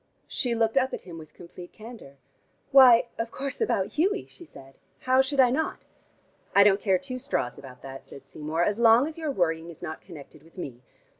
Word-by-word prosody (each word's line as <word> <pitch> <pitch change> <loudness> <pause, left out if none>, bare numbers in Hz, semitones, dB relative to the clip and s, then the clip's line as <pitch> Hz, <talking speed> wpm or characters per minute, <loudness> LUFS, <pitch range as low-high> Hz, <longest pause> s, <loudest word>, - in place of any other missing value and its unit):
She 245 -3 -2
looked 225 +2 0
up 265 0 +1
at - - -9
him 170 -3 -10
with 155 -1 -14
complete 175 0 -12
candor. 220 - -12 0.5
"Why, 250 -3 +7
of 230 0 -2
course, 275 - -6
about 200 - 0
Hughie," 395 +5 +1
she 345 - -14
said. 135 - -15 0.3
"How 260 +1 +3
should 270 +1 -3
I 250 -2 +6
not?" 315 +5 -2 0.7
"I 200 - +8
don't 200 0 +3
care 190 -3 +2
two 255 +3 -6
straws 250 - -3
about 125 -2 -13
that," 135 0 -9
said 140 - -14
Seymour, 155 +3 -3
"as 210 +4 -1
long 235 +2 +6
as 320 +1 -7
your 315 -2 -3
worrying 165 -8 -1
is 165 - -13
not 155 - -6
connected 160 -7 -13
with 165 +3 -22
me. 130 -8 -7
215 Hz, 205 wpm, -26 LUFS, 160-260 Hz, 0.7 s, I